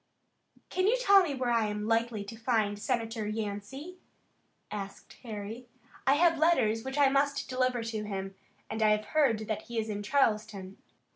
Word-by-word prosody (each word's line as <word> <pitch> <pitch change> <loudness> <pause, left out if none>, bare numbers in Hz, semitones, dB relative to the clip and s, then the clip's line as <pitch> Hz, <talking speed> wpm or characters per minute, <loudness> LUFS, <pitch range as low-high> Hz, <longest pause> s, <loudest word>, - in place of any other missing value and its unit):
"Can 370 +1 +1
you 475 +4 +4
tell 400 -6 +7
me 305 -6 -1
where 250 -2 -1
I 230 -2 +2
am 210 0 -3
likely 225 -2 +1
to 210 +3 -8
find 220 -3 0
Senator 225 -2 -2
Yancey?" 220 - -5 0.7
asked 200 -1 -7
Harry. 225 +1 -7 0.4
"I 275 - +6
have 330 0 +3
letters 225 -9 +3
which 265 +2 -5
I 285 -1 +6
must 280 +1 +1
deliver 255 -2 0
to 225 -2 -3
him, 195 -1 -4 0.3
and 220 0 -4
I 215 - +5
have 215 - -9
heard 230 -8 +1
that 215 - -2
he 235 - -7
is 220 0 -1
in 205 -1 -3
Charleston." 210 -5 0
225 Hz, 170 wpm, -30 LUFS, 210-270 Hz, 0.7 s, tell